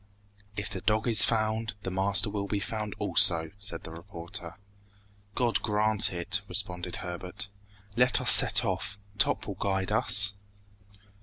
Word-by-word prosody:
"If 100 0 -4
the 95 -2 -6
dog 110 +2 -1
is 115 -2 +7
found, 110 -2 -2
the 95 - -5
master 100 +3 +2
will 100 -1 -5
be 100 0 -3
found 105 0 -6
also!" 80 -1 +3
said 100 -5 -6
the 80 - -10
reporter. 85 -1 -9 0.8
"God 120 -3 0
grant 105 0 0
it!" 85 -2 -3
responded 90 0 -3
Herbert. 90 +3 -7 0.5
"Let 125 +1 +2
us - - +6
set - - +6
off! 100 0 -4 0.2
Top - - +1
will 100 - -6
guide 95 +1 -4
us!" 105 -3 +5
100 Hz, 145 wpm, -26 LUFS, 90-110 Hz, 0.8 s, is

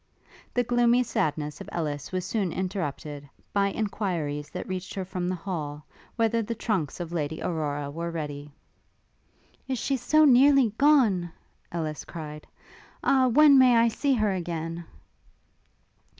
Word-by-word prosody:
The 245 - +3
gloomy 240 +1 +3
sadness 150 -9 -2
of - - -8
Ellis 150 -4 -3
was 185 -1 -2
soon 195 -3 -1
interrupted, 150 -6 -4 0.2
by 200 -1 +3
enquiries 180 -9 -2
that 180 - -6
reached 185 0 -5
her 190 -2 -3
from 180 -1 -3
the 185 - -1
hall, 155 -5 -5 0.3
whether 230 0 +1
the 230 +2 -4
trunks 190 - -2
of 170 -1 -5
Lady 160 -2 -3
Aurora 145 -4 -2
were 170 +3 -4
ready. 150 -3 -5 1.2
Is 260 -1 -1
she 270 +3 -1
so 310 +5 +4
nearly 270 -3 +5
gone? 235 - +4 0.4
Ellis 155 -3 -3
cried; 150 -2 -8 0.6
Ah! 260 -1 +4
when 280 +2 +7
may 250 -2 +6
I 230 0 +5
see 270 +4 +1
her 215 -3 +1
again? 170 -2 -4
185 Hz, 140 wpm, -27 LUFS, 155-235 Hz, 1.2 s, when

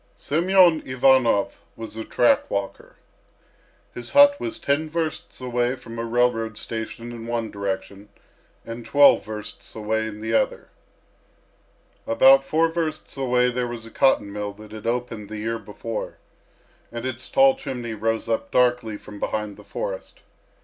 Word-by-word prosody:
Semyon 175 +1 +4
Ivanov 130 -5 +3 0.2
was 115 -1 -8
a 110 - -4
track 120 - +2
walker. 100 -1 -4 1.0
His 120 - -7
hut 285 0 +8
was 335 -2 -4
ten 155 - 0
versts 160 0 -4
away 125 0 0
from 115 -2 -9
a - - -2
railroad 115 -2 0
station 115 +1 -6
in 115 -1 -8
one 115 -2 -2
direction 100 0 -5 0.6
and 115 +1 -7
twelve 145 +4 +5
versts 105 -1 -8
away 110 0 -1
in 105 -1 -8
the 110 +1 -3
other. - - 0 1.4
About 135 +4 +6
four 160 +4 +2
versts 160 -2 -3
away 125 -2 +2
there 125 0 -1
was 120 -2 -6
a 115 - -12
cotton 105 -7 +2
mill 105 0 -4
that 105 +1 -14
had 110 +1 -7
opened 115 -3 -3
the 110 - -6
year 115 +2 -3
before, 105 +2 -6 0.7
and 115 +1 -6
its 130 0 -5
tall 270 0 +5
chimney 125 - -5
rose 110 +1 -1
up 115 -1 -1
darkly 125 -4 +2
from 105 0 -12
behind 105 -1 -3
the - - -14
forest. - - -6
120 Hz, 150 wpm, -23 LUFS, 110-135 Hz, 1.4 s, hut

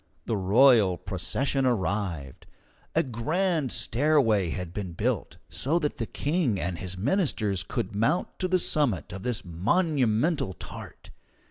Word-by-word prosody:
The 115 - -1
royal 105 -1 +5
procession 135 - -1
arrived. 95 - -2 0.5
A - - +4
grand 155 - -1
stairway 115 - +2
had 90 +1 -5
been 95 -4 -5
built, - - -2
so 150 +6 -1
that 150 -3 -1
the 115 -4 -3
King 145 - 0
and 85 -1 -3
his 95 0 -5
ministers 105 - 0
could 100 +2 -4
mount 135 - 0
to 185 - 0
the 185 0 +3
summit 140 - 0
of 95 - -6
this 120 -1 -3
monumental 125 - +1
tart. - - -10
115 Hz, 135 wpm, -27 LUFS, 95-150 Hz, 0.5 s, royal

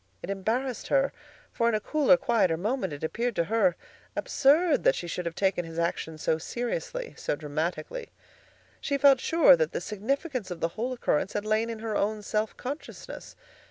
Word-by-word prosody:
It 190 - -3
embarrassed 230 +6 -2
her; 275 0 +2 0.4
for 230 0 +2
in 225 - +1
a - - +1
cooler, 275 +3 +4
quieter 215 -11 +2
moment 210 - -1
it 145 +1 -7
appeared 235 +8 -1
to 170 - +2
her 190 -1 +2 0.4
absurd 300 +4 +3
that - - +4
she - - -4
should 175 +1 -3
have 165 - -4
taken 190 -2 +1
his 165 0 -9
action 170 -1 -2
so 160 +1 0
seriously, - - -4
so - - -1
dramatically. 155 - -4 0.7
She 280 - -1
felt 275 -2 +6
sure 330 - +6
that - - -1
the - - -1
significance 255 - -3
of 175 -2 -5
the 165 - 0
whole 235 +8 -3
occurrence 220 -7 0
had 205 0 -2
lain 215 +2 +1
in 230 - -4
her 220 -1 -4
own 210 +1 0
self 215 +1 -1
consciousness. 280 +4 -7
220 Hz, 185 wpm, -28 LUFS, 175-270 Hz, 0.7 s, felt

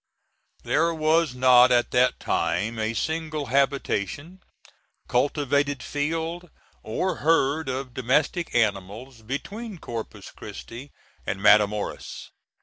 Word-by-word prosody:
There 165 +2 +1
was 155 -3 +2
not 125 0 +6
at 120 -1 +2
that 125 0 +2
time 110 +6 -1
a 110 +1 -1
single 155 +1 -2
habitation, 140 - -1 0.7
cultivated 140 +1 0
field, 165 +4 -3 0.3
or 180 +12 -2
herd 155 -2 +1
of 130 -1 -4
domestic 145 +7 0
animals, 110 +3 -1
between 195 - -6
Corpus 115 -7 -7
Christi 130 +5 -10 0.4
and 95 - -2
Matamoras. 105 0 +1
135 Hz, 100 wpm, -25 LUFS, 115-160 Hz, 0.7 s, not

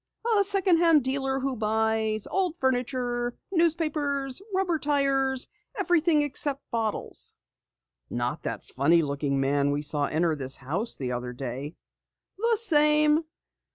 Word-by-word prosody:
"A - - +4
second 390 -3 +4
hand 330 -4 +4
dealer 270 +1 -1
who 270 0 -2
buys 220 -1 0
old 370 -4 -1
furniture, 245 -2 -1
newspapers, 305 -5 0
rubber 375 -4 0
tires 275 -3 +1 0.3
everything 330 -3 +2
except 285 -1 -1
bottles." 225 -2 -3 0.8
"Not 120 +5 -3
that - - -5
funny 160 +5 +2
looking 140 -1 -1
man 140 +1 +1
we 145 +1 -1
saw 145 -1 +2
enter 160 0 0
this 135 -2 0
house 175 - -1
the 130 -2 -4
other 125 0 -4
day!" 135 +4 -6 0.6
"The 460 +1 +2
same. 300 -4 +3
260 Hz, 125 wpm, -26 LUFS, -, 0.8 s, A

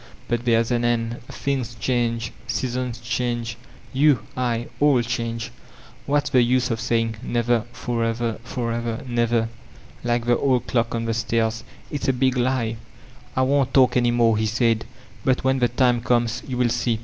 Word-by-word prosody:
But 120 0 -1
there 115 -2 +4
is 115 +1 -1
an 120 0 +1
end. 120 0 0
Things 130 -4 -3
change, 115 -1 -1 0.2
seasons 125 -1 -2
change, 120 -2 -2 0.4
you, 140 -3 +4
I, 120 -2 -1
all 145 -3 +5
change; 115 -1 -3 0.6
what's 145 0 +1
the 130 -3 +5
use 125 +1 +2
of 115 - -1
saying 115 0 0
'Never 120 -2 +1
— - - -23
forever, 115 -1 -1
forever 115 -1 -3
— - - -11
never/ 120 -1 +1 0.6
like 120 -1 0
the 120 0 +3
old 130 -3 +2
clock 115 -1 0
on 115 0 -2
the 115 - 0
stairs? 115 0 0 0.3
It's 145 - -3
a 135 - +4
big 130 +1 +2
lie." 125 -2 0 0.6
"I 130 - +3
won't 135 0 +2
talk 130 -2 +5
any 120 -1 +3
more," 115 -2 +3
he 110 - +1
said, 115 0 +1 0.4
'1)ut 130 -1 +1
when 130 0 +2
the 120 -1 +3
tnoe 120 -1 +2
comes 120 -2 +1
you 130 -2 -3
will 125 -1 +3
see." 120 -1 0
120 Hz, 175 wpm, -23 LUFS, 115-125 Hz, 0.6 s, all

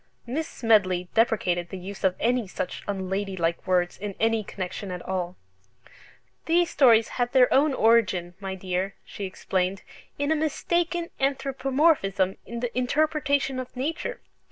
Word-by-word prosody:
Miss 295 +7 -2
Smedley 185 -6 +2
deprecated 180 -6 +1
the 190 - -6
use 190 +2 -8
of 185 -1 +3
any 240 -2 +1
such 180 - -4
unladylike 190 -3 -2
words 180 -1 +1
in 200 -1 -5
any 225 -1 +2
connection 190 0 -5
at 180 -1 -5
all. 180 -1 -2 1.1
"These 345 +1 +3
stories 230 -5 +5
had 245 0 0
their 255 -2 +5
origin, 225 - +3
my 195 -1 -4
dear," 185 +1 -2
she 200 - -6
explained, 185 +1 -2 0.3
"in 285 +2 0
a - - +4
mistaken 340 +2 -1
anthropomorphism 270 - +1
in 235 0 -5
the 245 -1 -3
interpretation 285 0 +1
of 255 0 -7
nature. 320 - -3
225 Hz, 135 wpm, -26 LUFS, 190-275 Hz, 1.1 s, stories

